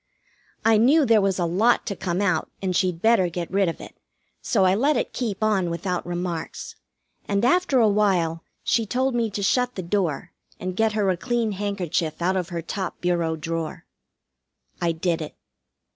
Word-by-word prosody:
I 225 -1 +5
knew 275 +7 +5
there 225 -3 +5
was 195 -1 +1
a 175 - 0
lot 210 +8 +2
to 200 - -3
come 180 +1 -2
out 180 -6 +1
and 185 -2 -2
she'd 180 -2 0
better 220 -6 +4
get 170 0 -5
rid 195 -2 +2
of 165 - -6
it, - - -11 0.5
so 195 -5 +2
I 185 - +4
let 280 +9 +2
it - - -2
keep 220 -4 -3
on 195 -5 +2
without 175 +2 -2
remarks, 175 -2 -4 0.5
and 200 +2 +1
after 325 0 +3
a 225 - +5
while 185 -6 +1 0.2
she 225 -2 +1
told 260 +4 0
me 235 -2 0
to 200 0 -4
shut 250 +4 +1
the 185 - -4
door, 175 -5 -1 0.3
and 185 0 -4
get 220 +1 +2
her 210 -2 +1
a 180 - -2
clean 235 +1 -1
handkerchief 185 -5 -2
out 180 +2 +1
of 180 -2 -2
her 170 -2 -4
top 190 +1 -4
bureau 170 -2 0
drawer. 165 0 -4 1.0
I 170 -1 +2
did 165 0 -1
it. 155 - -7
190 Hz, 190 wpm, -24 LUFS, 170-220 Hz, 1.0 s, I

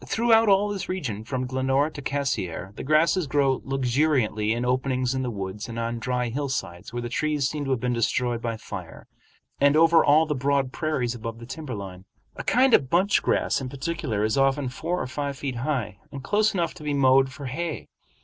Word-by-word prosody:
Throughout 225 -1 +3
all 200 +1 +4
this 200 -2 -4
region 125 - -3
from 130 +2 -3
Glenora 135 +3 +1
to 145 - -8
Cassiar 105 -10 -2
the - - -6
grasses 155 +3 +3
grow 135 -1 +1
luxuriantly 130 -5 +1
in 120 +2 -1
openings 130 0 0
in 130 - -1
the 125 - -2
woods 100 0 -5
and 115 - -6
on 115 0 -2
dry 125 0 -1
hillsides 120 -10 -4
where 120 0 -4
the - - -3
trees 145 +2 0
seem 145 0 -4
to - - -4
have 130 -3 +1
been 125 +1 -1
destroyed 120 0 0
by 115 -1 -3
fire, - - -9 0.5
and 140 +1 +4
over 165 0 +6
all 150 +2 +5
the 150 - -1
broad 140 -1 0
prairies 140 -6 -1
above 115 -1 -6
the 115 - -10
timber 135 0 -6
line. 95 -2 -8 0.3
A - - -6
kind 255 0 +3
of 130 - +4
bunch 185 +6 +3
grass - - +1
in 130 - -4
particular 140 -6 -2
is 110 +5 +1
often 135 0 +2
four 170 +7 -3
or - - -2
five 140 +1 -4
feet 135 -4 -4
high, 120 -6 -2
and 140 -2 -7
close 210 +5 +2
enough 170 -3 0
to 175 - -12
be 145 -1 -1
mowed 135 -1 +4
for 140 +1 -8
hay. 155 +5 -4
135 Hz, 205 wpm, -25 LUFS, 120-150 Hz, 0.5 s, over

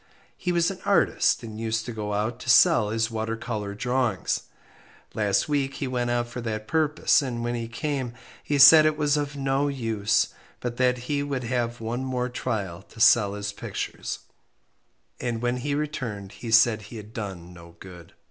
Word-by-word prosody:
He 180 - -2
was 170 +1 +2
an 190 - -8
artist, 200 -9 +2
and 110 -1 -7
used 110 -1 -1
to 120 - -5
go 105 -2 -3
out 110 +4 -2
to - - -6
sell 115 -2 +6
his 115 +1 0
water 115 0 -3
colour 105 -4 -4
drawings. 125 -3 -1 0.7
Last 105 -2 +1
week 140 -2 -1
he 140 - -3
went 125 -1 -1
out 120 0 0
for 120 +1 -7
that 110 -2 -4
purpose, 155 +1 +2
and 120 -4 -4
when 120 0 -1
he 115 -1 -3
came 130 0 -3 0.3
he 145 - 0
said 155 +3 +9
it 155 -1 0
was 150 -1 +2
of 145 -1 -2
no 135 +1 0
use, 110 -6 0 0.3
but 120 -1 -4
that 125 0 +2
he 145 -1 0
would 140 -3 -3
have 120 0 -2
one 115 +3 -3
more 125 -1 -2
trial 100 -8 -3
to 110 - -17
sell 115 -3 +5
his 105 0 -4
pictures, - - -5 1.0
and 120 -2 -2
when 120 +1 -1
he 140 +3 -2
returned 125 -10 -4
he 115 - -8
said 115 -1 +5
he 110 +3 -10
had 105 +1 -10
done 95 -6 -6
no 85 -1 -14
good. 90 -3 -12
120 Hz, 185 wpm, -25 LUFS, 110-135 Hz, 1.0 s, said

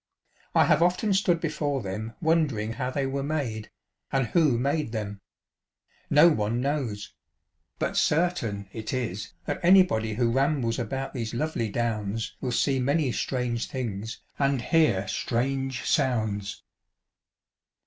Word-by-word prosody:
I - - +6
have 150 +1 +3
often 180 +4 +2
stood 185 -3 +2
before 145 -5 -1
them 105 +4 -5
wondering 150 -10 +1
how 125 +2 -2
they 135 +1 -1
were 135 +1 -2
made, 135 -8 -3 0.4
and 135 -1 +2
who 150 -3 +3
made 140 0 -1
them: 105 -2 -4 0.9
no 150 +3 +7
one 115 -7 +1
knows; 125 -7 -2 0.6
but - - -2
certain 150 - +1
it 110 +2 -5
is, 115 -6 -3
that - - -2
an} 185 +2 +8
body 110 - -2
who 120 0 +2
rambles 135 -3 +1
about 135 +3 -3
these 115 -2 -4
lovely 120 -5 -1
Downs 110 -1 -2
will 130 - -2
see 135 +2 +1
many 140 +1 +1
strange 120 -2 -2
things 110 -4 -5 0.2
and 140 -3 +1
hear 135 - +2
strange 135 +4 -1
sounds. 110 -8 0
125 Hz, 135 wpm, -27 LUFS, 110-145 Hz, 0.9 s, an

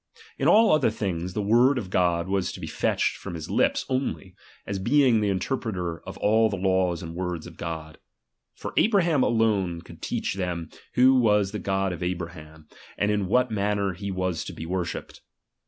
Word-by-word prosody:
In - - +2
all 225 +1 +6
other 155 -6 +4
things, 90 -5 -3
the 105 - -1
word 120 +6 +4
of 95 -7 -4
God 85 -1 +1
was 95 -1 0
to - - -8
be - - -5
fetched - - 0
from 95 -3 -7
his 80 -2 -6
lips - - +2
only, 130 -8 -2 0.3
as 100 - -3
being 125 +1 +4
the 105 - +1
interpreter 95 -4 -2
of - - -7
all 110 +1 +3
the 100 - -3
laws 95 -2 +1
and 80 0 -7
words 90 -2 -4
of 85 -2 -11
God. 80 -2 -6 0.6
For - - -7
Abraham 175 - +3
alone 105 -8 +1
could - - -14
teach - - -2
them 90 -4 -4 0.2
who 130 +1 +6
was 105 -4 +3
the 105 - -4
God 95 -1 -1
of 85 - -8
Abraham, 85 -3 -5 0.3
and 105 0 +1
in 105 -2 0
what 125 +4 +2
manner 100 -2 0
he 100 +3 -6
was 95 -3 -2
to - - -7
be 80 - -7
worshipped. 90 0 -4
95 Hz, 190 wpm, -26 LUFS, 90-110 Hz, 0.6 s, all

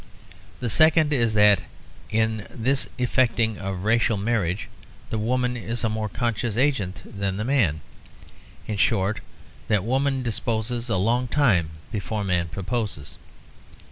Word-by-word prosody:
The 125 - -1
second 155 +4 +4
is 115 -5 +2
that 105 -2 +6 0.5
in 110 -1 0
this 130 +4 0
effecting 120 -3 +1
of 95 -1 -4
racial 115 0 +2
marriages 100 -2 0 0.5
the 110 - -1
woman 125 +2 0
is 120 0 -3
a 110 - +2
more 110 0 -2
conscious 115 -2 -2
agent 100 -10 0
than 100 -1 -3
the 105 - -2
man. 110 - +2 0.8
In 105 - -3
short, 100 -1 +2 0.5
that 105 -4 +2
woman 135 +3 0
disposes 115 +1 -1
a 95 - +1
long 120 +6 +1
time 110 - +2 0.2
before 105 0 -3
man 90 -3 0
proposes. 100 - -4
110 Hz, 135 wpm, -24 LUFS, 100-120 Hz, 0.8 s, that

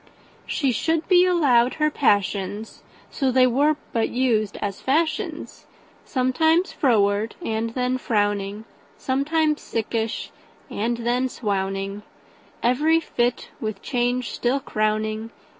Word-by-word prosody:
She 275 -4 0
should 320 +7 0
be 360 -1 +6
allowed 260 -9 +3
her 305 -1 +1
passions, 205 -4 0 0.3
So 270 -3 0
they 255 0 +5
were 285 +5 +3 0.2
but 225 -1 +1
used 230 -5 0
as 200 -2 -4
fashions; 315 +4 -1 0.4
Sometimes 320 +8 +2
froward, 215 -5 +2
and 225 +1 -1
then 255 0 0
frowning, 205 -2 -1 0.3
Sometimes 300 +3 0
sickish, 225 0 -3 0.4
and 230 +3 -1
then 250 +2 +1
swowning, 195 -2 -3 0.6
Every 300 +7 +3
fit 245 -6 -1
with 215 -3 -5
change 245 0 -1
still 250 +3 0
crowning. 215 -1 -1
240 Hz, 110 wpm, -23 LUFS, 215-275 Hz, 0.6 s, be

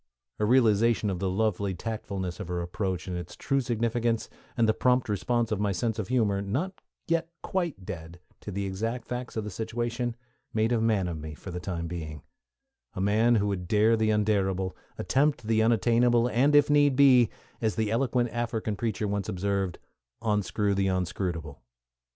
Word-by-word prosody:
A 105 - +2
realization 115 -2 +3
of 90 - -3
the 95 - 0
lovely 100 -1 0
tactfulness 95 -4 -4
of 105 - -5
her 90 0 -2
approach 90 0 -3
and 90 - -3
its 90 -1 -6
true 135 0 0
significance, 115 -1 -1 0.3
and 115 -2 +4
the 110 - +4
prompt 125 +2 +2
response 115 +3 0
of 105 - 0
my 105 -1 +1
sense 110 +4 -1
of 100 - -2
humor, 105 -5 +1
not 140 - -3 0.3
yet 165 0 0
quite 170 - -2
dead, 85 0 -7 0.2
to - - -8
the 100 0 -2
exact 115 +6 -3
facts 125 -1 -5
of 110 - -1
the 105 - -5
situation, 120 +3 -2 0.4
made 110 +1 +2
a 115 -2 +2
man 110 -5 +2
of 85 -3 -4
me 75 0 -7
for 95 - -9
the 90 - -4
time 85 -2 -4
being 80 -4 -6 0.7
a - - -4
man 110 +5 +3
who 105 -2 +2
would 90 -3 -3
dare 110 +3 +4
the 110 -1 +1
undarable, 95 -3 +1 0.2
attempt 135 +7 +1
the 110 0 +2
unattainable, 120 +2 +3
and 140 +5 +3
if 145 -1 +6
need 145 -2 +4
be, 130 -5 +6 0.3
as 110 -5 0
the 110 0 0
eloquent 120 0 +1
African 115 -2 -2
preacher 110 -1 -2
once 100 -2 -2
observed, 95 -1 -1 0.4
"onscrew 105 -2 0
the 95 0 +1
onscrutable." 90 -4 -2
110 Hz, 180 wpm, -28 LUFS, 95-120 Hz, 0.7 s, if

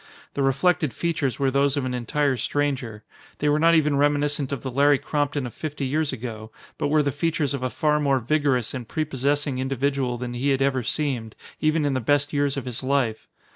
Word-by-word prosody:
The 140 - -2
reflected 150 +2 +2
features 160 -6 -1
were 135 -2 +1
those 140 +1 +2
of 140 - -1
an 130 - -2
entire 135 +3 0
stranger. 130 -4 -2 0.3
They 150 - +1
were 150 +1 +3
not 165 +1 +5
even 150 -3 +3
reminiscent 145 -1 +1
of 140 - -4
the 130 - -3
Larry 140 +2 +4
Crompton 145 -1 -1
of 120 - -6
fifty 150 -3 -4
years 150 +3 0
ago, 110 -3 -6 0.3
but - - +1
were 150 +1 +3
the 140 - 0
features 150 -1 -1
of 140 - -3
a 130 - -1
far 150 +3 +1
more 140 -2 +2
vigorous 130 -2 +1
and 125 -4 -5
prepossessing 145 -1 -1
individual 135 -1 -1
than 120 0 -5
he 125 +4 -1
had 135 -1 +1
ever 135 -2 +1
seemed, 125 -3 -2 0.2
even 155 0 +2
in 145 - +1
the 130 - 0
best 145 +4 +1
years 145 -1 +1
of 135 - -4
his 125 -2 -5
life. 130 -4 0
140 Hz, 210 wpm, -24 LUFS, 130-145 Hz, 0.3 s, not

